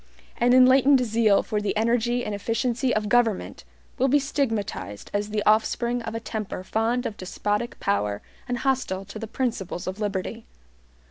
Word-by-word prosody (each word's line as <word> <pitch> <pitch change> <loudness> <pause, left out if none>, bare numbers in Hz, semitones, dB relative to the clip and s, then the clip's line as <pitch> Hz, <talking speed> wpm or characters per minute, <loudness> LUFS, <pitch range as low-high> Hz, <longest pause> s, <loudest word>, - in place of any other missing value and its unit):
An 240 +1 +3
enlightened 260 +1 +6
zeal 220 -2 +3
for 210 -1 -2
the 210 +1 -1
energy 240 +2 +1
and 210 - -3
efficiency 235 +4 -1
of 215 -2 0
government 225 -2 +1 0.4
will 265 - +3
be 280 +2 +4
stigmatized 225 - -3
as 205 +1 -1
the 210 -1 -1
offspring 235 +3 +2
of 225 -1 -5
a - - -2
temper 215 -5 -5
fond 230 +5 0
of 210 - -4
despotic 205 +5 -3
power 105 - -1 0.2
and 245 -1 -1
hostile 245 -8 -1
to 205 +2 -9
the 225 - -5
principles 220 -8 -3
of 185 +2 -5
liberty. 205 +2 -3
225 Hz, 160 wpm, -25 LUFS, 205-245 Hz, 0.4 s, enlightened